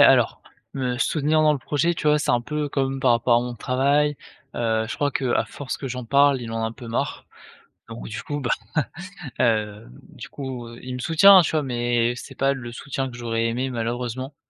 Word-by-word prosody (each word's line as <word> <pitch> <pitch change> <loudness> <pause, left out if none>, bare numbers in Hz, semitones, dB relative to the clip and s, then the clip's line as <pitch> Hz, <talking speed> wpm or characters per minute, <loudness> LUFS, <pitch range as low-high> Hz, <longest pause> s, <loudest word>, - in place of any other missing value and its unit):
alors, - - +5 0.3
me 125 -2 -2
soutenir 155 +3 +2
dans 155 -1 +5
le 145 - -1
projet, 150 +5 0
tu 155 - -4
vois? 150 0 +5
C'est 150 - 0
un 120 - +3
peu 150 +4 -3
comme 135 -1 -1
par 130 -2 +3
rapport 120 0 +3
à - - +3
mon 125 0 -5
travail, 140 +5 +1 0.4
heu, 110 -1 0
je 110 - -3
crois 145 +3 0
qu'à 130 -2 0
force 140 -2 -6
que 135 - -6
j'en 125 0 -5
parle, 140 +1 +4
il 115 -2 -6
en 115 0 -2
a - - +1
un 115 - -4
peu 120 -1 -10
marre, 115 - -3 0.6
donc, 115 0 -8
du 105 - -5
coup, 145 -1 -4
bah, 120 - -2 0.9
hem, 105 - 0 0.2
du - - -10
coup, 130 -4 -6
heu, 115 0 -11
il 130 0 -5
me 125 - -5
soutient, 185 +6 +7
tu 165 - -1
vois? 155 -2 +1
Mais 120 -2 0
c'est - - -10
pas 135 +1 +2
le 120 -3 -7
soutien 135 +2 -4
que 120 - -10
j'aurais 115 -1 -1
aimé, 130 +3 -2
malheureusement. 120 +3 -3
130 Hz, 220 wpm, -23 LUFS, 120-140 Hz, 0.9 s, soutient